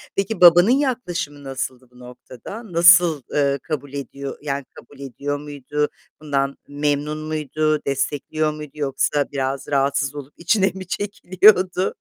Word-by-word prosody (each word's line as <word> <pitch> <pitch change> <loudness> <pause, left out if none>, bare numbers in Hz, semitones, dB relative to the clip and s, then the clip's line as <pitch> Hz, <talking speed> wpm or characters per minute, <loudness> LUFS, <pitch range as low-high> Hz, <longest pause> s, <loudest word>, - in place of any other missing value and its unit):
Peki, 195 +2 -2
babanın 175 +5 +8
yaklaşımı 185 - -1
nasıldı 130 -2 -5
bu 125 - -19
noktada? 125 - -11
Nasıl, 170 -3 +6
ııı, 140 -1 +1
kabul 145 -3 -5
ediyor 140 0 -6
yani, 140 -2 -3
kabul 135 +4 -15
ediyor 140 +1 -4
muydu? 145 0 -3 0.3
Bundan 140 -2 -1
memnun 145 +1 -1
muydu? 155 0 -1
Destekliyor 145 +3 -1
muydu 150 -1 -9
yoksa 145 0 0
biraz 135 0 -3
rahatsız 140 0 0
olup 145 0 -9
içine 190 +3 +2
mi 190 -1 -9
çekiliyordu? 185 -1 +2
145 Hz, 130 wpm, -21 LUFS, 140-170 Hz, 0.3 s, babanın